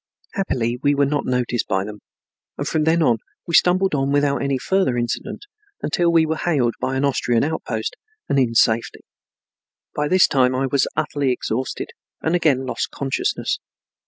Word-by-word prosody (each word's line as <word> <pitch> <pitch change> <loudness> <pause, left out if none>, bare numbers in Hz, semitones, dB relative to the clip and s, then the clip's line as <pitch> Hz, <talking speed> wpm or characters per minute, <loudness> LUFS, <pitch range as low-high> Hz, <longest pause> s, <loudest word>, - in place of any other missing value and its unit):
Happily 125 - -1
we 145 0 +3
were 140 0 +3
not 145 +1 -1
noticed 125 -2 0
by 95 0 0
them, 105 0 -8 0.6
and - - -3
from 155 -1 0
then 165 +1 +3 0.4
we 170 - -6
stumbled 180 +2 +4
on 135 -1 0
without 145 0 +2
any 140 -1 0
further 190 -4 +1
incident 120 - -3 0.4
until 170 +2 +1
we 165 -1 +4
were 160 0 -1
hailed 135 -10 +1
by 130 - -1
an 135 +2 +1
Austrian 120 -4 +1
outpost 130 -7 -3 0.3
and 140 - +2
in 120 -3 +1
safety. 115 0 +2 0.9
By 150 0 0
this 185 +3 +5
time 130 -2 +2
I 135 +1 0
was 135 +1 +1
utterly 140 -3 0
exhausted 125 +1 -3 0.3
and 160 - -1
again 150 -7 +2
lost 130 - -2
consciousness. 135 -1 -2
140 Hz, 165 wpm, -21 LUFS, 125-160 Hz, 0.9 s, this